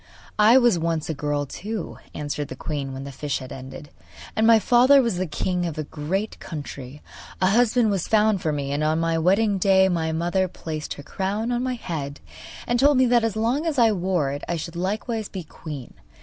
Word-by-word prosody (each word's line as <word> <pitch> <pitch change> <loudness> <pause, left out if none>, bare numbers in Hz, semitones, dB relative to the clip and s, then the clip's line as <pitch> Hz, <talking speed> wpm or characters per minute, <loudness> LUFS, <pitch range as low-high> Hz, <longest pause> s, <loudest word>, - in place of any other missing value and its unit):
'I 220 +4 +7
was 240 -8 +4
once 165 -1 -1
a - - -2
girl 145 0 -2
too,' 205 +7 -6 0.2
answered 145 -1 -3
the 130 - -7
queen, 140 0 -4
when 135 0 -6
the 140 - -7
fish 140 0 -3
had 130 0 -9
ended; 135 +3 -9 0.4
'and 220 +1 +3
my 230 -1 +8
father 250 +6 +5
was 230 -8 +1
the 185 0 -1
king 180 +3 -1
of 160 - -6
a 155 - -2
great 165 +9 -3
country. 145 -3 -8 0.4
A 185 0 +3
husband 235 0 +3
was 195 -4 -1
found 215 -3 +3
for 155 - 0
me, 140 -2 -3
and 145 +2 -1
on 155 +1 +1
my 165 0 +1
wedding 195 +4 +2
day 190 0 +4
my 165 -3 0
mother 175 +4 0
placed 155 -3 -6
her 145 - -10
crown 205 +8 -2
on 240 0 0
my 255 0 -1
head 145 - -5 0.5
and 240 0 0
told 285 +1 +5
me 260 - +5
that 240 -1 +3
as 225 -2 0
long 240 +9 0
as 305 -3 -1
I 230 -3 +5
wore 180 -7 0
it 145 +1 -5
I 175 - 0
should 170 +1 -6
likewise 210 +4 -2
be 185 -3 -6
queen. 150 -4 -9
180 Hz, 215 wpm, -24 LUFS, 150-220 Hz, 0.5 s, my